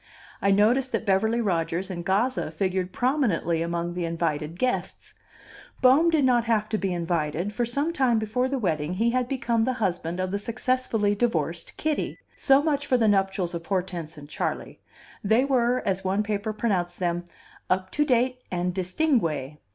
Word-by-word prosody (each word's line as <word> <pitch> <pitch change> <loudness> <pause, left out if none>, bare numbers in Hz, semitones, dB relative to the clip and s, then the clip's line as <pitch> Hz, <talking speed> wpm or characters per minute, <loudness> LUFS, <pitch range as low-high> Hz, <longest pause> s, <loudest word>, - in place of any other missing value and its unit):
I 200 - +2
noticed 235 +7 +3
that - - -1
Beverly 220 +4 +2
Rodgers 175 -1 -1
and 175 -2 -5
Gazza 205 +4 0
figured 185 +2 -2
prominently 230 - +1
among 170 +1 -2
the 175 0 -3
invited 165 -1 -2
guests: 255 +4 -2 0.7
Bohm 275 +7 +5
did 310 -4 +3
not 240 -2 +3
have 220 -2 +1
to 215 - -1
be 195 -1 -1
invited, 170 +2 -1
for 240 +2 -1
some 285 +7 -1
time 255 -6 +2
before 220 +4 0
the 275 +1 -1
wedding 165 - -1
he 230 +4 +2
had 250 0 0
become 235 -4 0
the 255 +3 +1
husband 175 -4 -2
of 185 0 -1
the 200 - -1
successfully 230 -2 0
divorced 170 -7 -1
Kitty. 310 -1 -2 0.2
So 275 +1 +4
much 290 -2 0
for 255 - +3
the 225 -2 +2
nuptials 195 -3 +1
of 165 -1 -6
Hortense 175 -5 -3
and 145 -1 -10
Charley; - - -4 0.4
they 220 +6 +3
were, 250 -2 +1
as 190 -1 0
one 195 +3 +1
paper 210 0 -2
pronounced 190 -5 -1
them, 175 -1 -1 0.4
"up 185 0 0
to 295 - +2
date 255 -2 +1
and 180 0 -1
distingue." 180 - 0
205 Hz, 175 wpm, -26 LUFS, 175-245 Hz, 0.7 s, Bohm